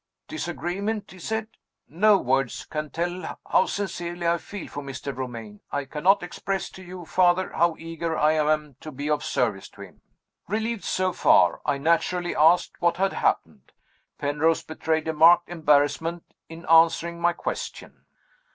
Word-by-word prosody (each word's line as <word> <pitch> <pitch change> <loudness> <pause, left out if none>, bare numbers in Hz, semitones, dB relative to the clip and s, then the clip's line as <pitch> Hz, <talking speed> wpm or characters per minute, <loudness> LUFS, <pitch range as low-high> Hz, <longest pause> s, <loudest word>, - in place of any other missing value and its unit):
'Disagreement?' 200 - -4
he 185 - -13
said. 220 +4 -3 0.4
'No 205 +6 +4
words 135 -4 -1
can 150 -1 -4
tell 175 +3 -4
how - - +3
sincerely 175 -3 -4
I 170 0 +2
feel 200 +1 -8
for 145 - -7
Mr. 140 -1 -6
Romayne. 115 -5 -7
I 145 -1 -2
cannot 175 +8 +2
express 190 +2 -4
to 190 - -12
you, 180 -1 -9
Father, 180 +1 +2
how 170 -1 +2
eager 165 0 -4
I 150 +1 +4
am 150 -3 0
to 155 - -9
be 145 +2 -4
of 150 -1 0
service - - -1
to - - -15
him!' - - -13 0.5
"Relieved, 220 +2 -2
so 185 -1 0
far, 90 - +4
I 145 - +1
naturally 170 +4 0
asked 165 +4 +3
what 170 0 +2
had 195 +1 +1
happened. - - -2 0.4
Penrose 150 +3 +1
betrayed 160 0 -2
a 160 - 0
marked 170 +3 +6
embarrassment 160 +1 +1 0.3
in 165 +2 -10
answering 165 +1 +4
my 175 0 +3
question. - - -6
165 Hz, 155 wpm, -25 LUFS, 150-180 Hz, 0.5 s, marked